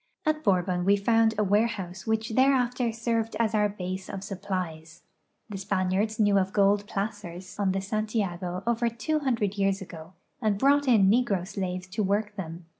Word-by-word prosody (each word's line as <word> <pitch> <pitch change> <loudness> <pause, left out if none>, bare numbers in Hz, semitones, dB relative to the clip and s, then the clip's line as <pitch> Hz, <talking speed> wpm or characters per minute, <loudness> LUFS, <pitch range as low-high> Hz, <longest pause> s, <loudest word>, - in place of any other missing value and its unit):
At 310 0 0
Borhon 180 -2 +1
we 200 +2 +4
found 225 +2 +3
a 210 - +2
warehouse 200 -3 0
which 220 0 0
thereafter 250 -1 +2
served 230 -1 -1
as 225 -1 +1
our 210 -1 +3
base 185 -1 -5
of 195 - -5
supplies. 180 -5 -5 0.4
The 205 -3 -6
Spaniards 195 +3 0
knew 205 -2 +4
of 190 0 -2
gold 205 0 +3
jdacers 195 -3 -5
on 195 -2 +2
the 195 +1 -1
Santiago 195 -4 -2
over 235 0 +1
two 235 +7 -1
hundred 235 -8 0
3'^ears 195 -1 0
ago 170 -3 -10 0.3
and 215 -3 +1
brought 285 +4 +3
in 215 -6 +5
negro 205 -4 +2
slaves 185 -2 -4
to 200 - -2
work 210 +1 0
them. 170 -3 -7
205 Hz, 170 wpm, -27 LUFS, 185-225 Hz, 0.4 s, in